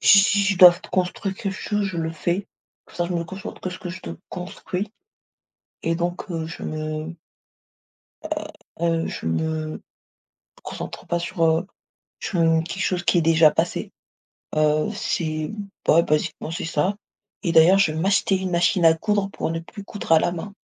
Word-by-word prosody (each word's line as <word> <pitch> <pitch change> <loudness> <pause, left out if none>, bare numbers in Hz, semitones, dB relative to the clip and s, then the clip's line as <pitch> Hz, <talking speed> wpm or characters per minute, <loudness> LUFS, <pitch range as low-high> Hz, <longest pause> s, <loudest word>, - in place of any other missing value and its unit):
si 200 - +7
si 205 +1 +4
je 195 -2 +1
dois 180 -1 +11
f 175 - -11
construire 185 +1 -1
quelque 195 0 -3
chose, 210 +1 -1
je 190 -3 -3
le 160 0 -1
fais, 175 +4 -1 0.4
comme - - -16
ça, 175 - +1
je 180 - -3
me 170 -1 -1
concentre 190 +3 -8
que 185 - -3
ce 180 - -7
que 190 -4 -6
je 185 - -8
te 85 - -7 0.2
construis 185 +2 -5 0.9
et 165 0 0
donc, 175 +2 -3
heu, 165 -2 -3
je 165 - -8
me 155 +1 -4 1.1
heu - - -6 0.5
heu 165 -1 +1
je - - -6
me, 80 - +1 0.3
heu, - - -16 0.8
concentre - - -7
pas 175 - 0
sur, 170 +1 -4
heu, 165 +3 +2 0.5
sur 180 - -1
une 165 0 +3
quelque 185 +3 -4
chose 180 -1 0
qui 175 - +3
est - - +3
déjà 160 -1 +6
passé, - - -1 0.6
heu, 155 0 +2
c'est 155 -1 -2 0.4
bah - - +5
ouais, 170 - +7
basiquement, 155 +1 -1
c'est 165 - -4
ça 165 +4 0 0.5
et 170 - +2
d'ailleurs, 165 +4 +7
je 190 -5 +3
vais 155 - -4
m'acheter 195 +1 +2
une 185 0 -3
machine 175 0 +3
à 160 - +7
coudre 205 +3 0
pour - - -3
ne 165 0 -2
plus 200 +4 -11
coudre 205 -5 -4
à 160 - +8
la 175 - 0
main. 195 +4 -6
175 Hz, 195 wpm, -23 LUFS, 160-190 Hz, 1.1 s, dois